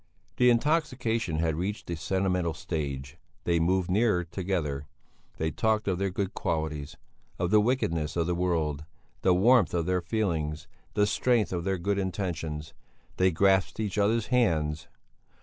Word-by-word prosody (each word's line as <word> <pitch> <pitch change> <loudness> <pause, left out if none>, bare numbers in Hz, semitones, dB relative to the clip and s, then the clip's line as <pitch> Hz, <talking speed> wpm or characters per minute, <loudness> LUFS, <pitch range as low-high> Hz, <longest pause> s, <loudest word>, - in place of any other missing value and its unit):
The 125 0 +5
intoxication 120 - +1
had 80 0 +1
reached 100 +5 -3
the 85 - -3
sentimental 90 -1 0
stage; 70 -5 -4 0.3
they 85 -1 +2
moved 90 +2 +1
nearer 105 -3 +3
together; 85 -6 -3 0.5
they 80 0 -1
talked 110 +2 0
of 95 -2 0
their 100 0 0
good 95 +1 -3
qualities, 80 -3 -3 0.4
of 90 +1 -1
the 105 -1 +6
wickedness 85 - 0
of 85 -1 +1
the 90 - 0
world, 80 -4 0 0.4
the 90 -1 +4
warmth 110 0 +4
of 85 -2 0
their 90 0 +1
feelings, 80 -6 -2 0.3
the 105 -1 +4
strength 115 0 +1
of 85 -1 -2
their 95 -1 0
good 100 +3 -1
intentions; 85 -5 -3 0.4
they 95 0 +4
grasped 95 +3 +2
each 105 -1 -1
other's 105 +2 +2
hands. 80 -9 +1
90 Hz, 150 wpm, -28 LUFS, 80-105 Hz, 0.5 s, the